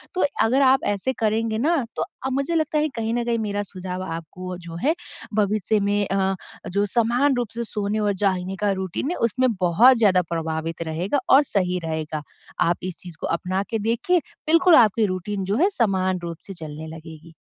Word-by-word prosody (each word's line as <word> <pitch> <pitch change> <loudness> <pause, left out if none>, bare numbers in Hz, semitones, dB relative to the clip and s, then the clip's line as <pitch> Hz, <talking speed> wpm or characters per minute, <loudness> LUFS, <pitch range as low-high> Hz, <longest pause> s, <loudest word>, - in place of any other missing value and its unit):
तो 370 - +3 0.2
अगर 255 +5 +3
आप 265 0 +4
ऐसे 205 +7 -2
करेंगे 220 0 +1
ना 290 +2 +1
तो - - 0 0.2
आ - - +1
मुझे 275 +5 0
लगता 315 -1 +1
है 305 +1 +1
कहीं 225 -1 -1
न 240 0 0
कहीं 235 -1 0
मेरा 205 -1 -2
सुझाव 185 -1 -6
आपको 180 +2 -6
जो 170 -2 -9
है 310 +4 +3 0.4
भविष्य 210 0 +1
में 205 0 +1
अ, 195 0 +1 0.3
जो 200 +3 +1
समान 240 +6 +2
रूप 240 -3 -1
से 235 - -2
सोने 210 0 -2
और 205 -1 +1
जागने 190 -1 -1
का 205 -1 +2
रूटीन 190 - -2
है - - -1
उसमें 255 +3 +1
बहुत 220 +9 +6
ज़्यादा 195 -5 +4
प्रभावित 165 0 -3
रहेगा 170 - -1
और 275 +2 +7
सही 180 -8 0
रहेगा। 155 -1 -3 0.4
आप 170 - +2
इस 185 -1 -4
चीज़ 175 -3 -10
को - - -1
अपना 185 +3 -1
के 225 - -1
देखिए, 230 - +1 0.3
बिल्कुल 335 +2 +6
आपकी 220 -3 +5
रूटीन 190 +1 -3
जो 200 +3 0
है 360 +8 +4
समान 190 -4 +1
रूप 170 -1 -5
से 195 - -6
चलने 155 -2 -8
लगेगी। 160 0 -11
200 Hz, 195 wpm, -23 LUFS, 180-235 Hz, 0.4 s, और